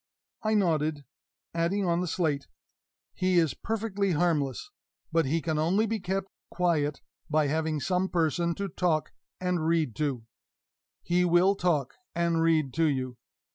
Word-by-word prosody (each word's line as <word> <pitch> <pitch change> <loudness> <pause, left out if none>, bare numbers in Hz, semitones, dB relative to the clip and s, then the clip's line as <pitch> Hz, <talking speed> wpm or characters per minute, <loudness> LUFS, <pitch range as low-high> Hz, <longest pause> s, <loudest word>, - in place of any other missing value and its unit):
I 215 -1 +1
nodded, 155 -6 +1 0.5
adding 170 +4 0
on 170 0 +1
the 180 - -2
slate, 155 -5 -1 0.7
"He 185 -1 +1
is 165 -4 +3
perfectly 205 -4 -1
harmless, 155 - 0 0.4
but 165 -3 +2
he 160 +4 0
can 160 -2 0
only 185 +8 +2
be 225 0 -1
kept 190 +1 -2 0.2
quiet 155 -5 0 0.3
by 155 0 +3
having 155 +1 0
some 185 +4 0
person 170 0 +1
to 200 - -3
talk 170 -3 0 0.3
and 180 -3 0
read 160 -8 +1
to. 140 -7 -1 0.8
He 175 +1 +2
will 180 +2 +4
talk 170 -9 0 0.2
and 170 -1 +1
read 155 -5 +2
to 165 0 +2
you. 130 -4 -1
165 Hz, 145 wpm, -28 LUFS, 155-180 Hz, 0.8 s, will